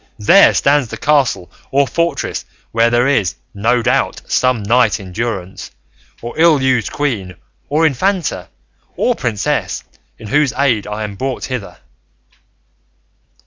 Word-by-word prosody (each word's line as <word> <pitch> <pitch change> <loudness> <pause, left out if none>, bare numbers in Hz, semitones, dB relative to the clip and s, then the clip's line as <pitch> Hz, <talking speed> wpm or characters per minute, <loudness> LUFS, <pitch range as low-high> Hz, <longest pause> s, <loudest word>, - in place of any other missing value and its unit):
there 195 - +7
stands 145 -2 +2
the - - -7
castle 140 -11 +1 0.2
or 140 +1 +2
fortress, 170 +7 -2 0.3
where 115 +1 +3
there 120 +1 +2
is, 100 - +1 0.2
no 115 +4 +1
doubt, - - 0
some 125 -4 +1
knight 120 +3 +2
in 95 -2 -10
durance, 95 -3 -4 0.5
or 120 - -5
ill 160 -3 +5
used 130 -5 +1
queen, 105 -11 -3 0.3
or 155 +3 +2
infanta, 180 +6 -1 0.5
or 245 - +2
princess, 115 - -2 0.3
in 110 - -10
whose 145 0 +2
aid 125 -7 +1
I 105 +1 -4
am 105 -1 -5
brought 130 +4 -3
hither." 125 -6 -6
125 Hz, 135 wpm, -16 LUFS, 105-140 Hz, 0.5 s, there